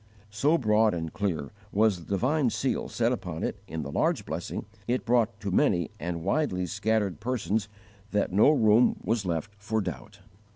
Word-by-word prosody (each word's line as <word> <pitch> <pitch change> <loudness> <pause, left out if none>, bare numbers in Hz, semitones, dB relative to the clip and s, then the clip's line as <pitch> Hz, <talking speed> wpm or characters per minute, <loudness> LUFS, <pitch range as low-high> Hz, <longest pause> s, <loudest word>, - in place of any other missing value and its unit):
So 145 +11 +3
broad 110 - +3
and 80 -1 -4
clear 85 -9 -2 0.2
was 105 -3 +3
the 80 - -12
divine 130 +7 +2
seal 130 +3 -1
set 115 0 +1
upon 90 -9 -4
it - - -3
in 80 -1 -4
the 70 - -6
large - - +1
blessing - - -4 0.2
it 125 +1 0
brought 120 -1 +2
to 100 -2 -3
many 85 -3 +2
and 85 -1 -4
widely 95 - 0
scattered 100 -3 0
persons 110 -4 -1 0.4
that 105 -3 0
no 105 +8 +6
room 115 -5 +5
was 110 -4 0
left 85 +3 -2
for 110 +2 -1
doubt. 80 - -6
105 Hz, 170 wpm, -28 LUFS, 90-115 Hz, 0.4 s, no